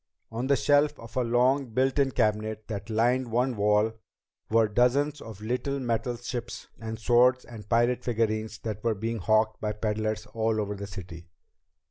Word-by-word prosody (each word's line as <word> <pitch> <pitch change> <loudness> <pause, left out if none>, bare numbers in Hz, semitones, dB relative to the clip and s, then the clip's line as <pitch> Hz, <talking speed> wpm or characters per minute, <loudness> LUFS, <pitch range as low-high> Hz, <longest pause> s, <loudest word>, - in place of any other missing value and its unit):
On 120 +3 -3
the 140 - +4
shelves 145 +2 +3
of 115 -1 -12
a 130 - +2
long 125 +3 +2
built 135 +2 +2
in 140 -1 +3
cabinet 110 -3 -1
that 100 0 -5
lined 120 +3 +1
one 125 +2 +1
wall 105 +1 +3 0.6
were 115 0 +4
dozens 135 +7 +2
of 110 -3 -9
the 105 - -10
little 130 +4 -1
metal 120 0 -1
ships 120 0 -6
and 110 -1 -5
swords 125 +3 +3
and 105 -3 -11
pirate 120 +2 +2
figurines 110 -2 -1
that 105 -2 -4
were 115 -2 +1
being 115 +3 -3
hawked 110 +3 +2
by 105 -1 -1
peddlers 110 0 -2
all 110 -1 0
over 105 -1 -2
the 100 0 -6
city. 90 -4 -9
115 Hz, 175 wpm, -27 LUFS, 110-125 Hz, 0.6 s, the